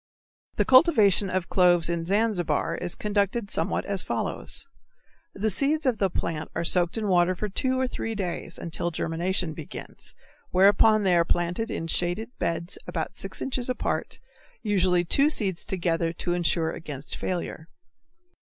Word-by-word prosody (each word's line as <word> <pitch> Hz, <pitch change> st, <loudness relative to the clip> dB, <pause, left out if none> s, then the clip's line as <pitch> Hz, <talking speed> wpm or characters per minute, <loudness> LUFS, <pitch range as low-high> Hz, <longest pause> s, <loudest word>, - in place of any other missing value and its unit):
The -, -, +1 dB
cultivation 220 Hz, -, +5 dB
of 185 Hz, -1 st, -1 dB
cloves 175 Hz, -3 st, +4 dB
in 170 Hz, -1 st, -2 dB
Zanzibar 195 Hz, -7 st, +1 dB
is 180 Hz, -1 st, -4 dB
conducted 205 Hz, +1 st, -1 dB
somewhat -, -, 0 dB
as 200 Hz, -2 st, -2 dB
follows: -, -, -3 dB, 0.7 s
The 215 Hz, +2 st, 0 dB
seeds 300 Hz, +5 st, +1 dB
of 245 Hz, -5 st, +1 dB
the 195 Hz, -, +2 dB
plant 160 Hz, -3 st, -3 dB
are -, -, -1 dB
soaked 175 Hz, +3 st, +1 dB
in 215 Hz, -2 st, -1 dB
water 180 Hz, -1 st, +3 dB
for 210 Hz, -, -3 dB
two 260 Hz, +6 st, 0 dB
or 260 Hz, -, +2 dB
three 225 Hz, -2 st, -4 dB
days 175 Hz, -3 st, -4 dB
or -, -, -9 dB
until 170 Hz, +1 st, -2 dB
germination 170 Hz, +1 st, -1 dB
begins, 155 Hz, -2 st, -9 dB, 0.3 s
whereupon 205 Hz, +3 st, +5 dB
they 185 Hz, -2 st, +3 dB
are 170 Hz, -, +5 dB
planted 175 Hz, +7 st, -1 dB
in 165 Hz, -, -3 dB
shaded 175 Hz, +7 st, -1 dB
beds 170 Hz, +2 st, -2 dB
about -, -, -4 dB
six -, -, -4 dB
inches 255 Hz, -2 st, -2 dB
apart, 250 Hz, -, -2 dB, 0.5 s
usually 185 Hz, -4 st, +2 dB
two 280 Hz, -, +4 dB
seeds 195 Hz, -, -1 dB
together 170 Hz, -3 st, -1 dB
to 175 Hz, +1 st, -2 dB
insure 170 Hz, -2 st, +1 dB
against 145 Hz, -4 st, -6 dB
failure. 170 Hz, -3 st, -4 dB
185 Hz, 155 wpm, -26 LUFS, 170-215 Hz, 0.7 s, cultivation